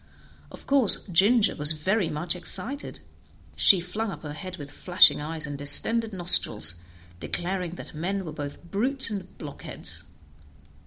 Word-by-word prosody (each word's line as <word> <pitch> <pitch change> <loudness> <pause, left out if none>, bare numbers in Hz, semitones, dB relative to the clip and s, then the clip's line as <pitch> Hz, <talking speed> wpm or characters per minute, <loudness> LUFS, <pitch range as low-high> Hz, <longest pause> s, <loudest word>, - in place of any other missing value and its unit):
Of - - -11
course 270 -7 +2
Ginger 205 +5 +3
was 150 +1 +4
very 185 +4 -1
much 165 +3 -4
excited; 265 +10 -2 0.5
she 190 - +6
flung 210 +6 -5
up 165 -5 -9
her 145 -1 -7
head 185 +4 -9
with 145 -2 -9
flashing 180 -4 +4
eyes 160 +1 -5
and 145 -1 -7
distended 215 +11 +3
nostrils, 175 - +1 0.5
declaring 180 - -4
that - - -11
men 190 +5 -4
were 160 - -7
both 145 -1 -8
brutes 260 +4 +5
and 190 -3 -7
blockheads. 145 -3 -8
180 Hz, 145 wpm, -25 LUFS, 150-205 Hz, 0.5 s, she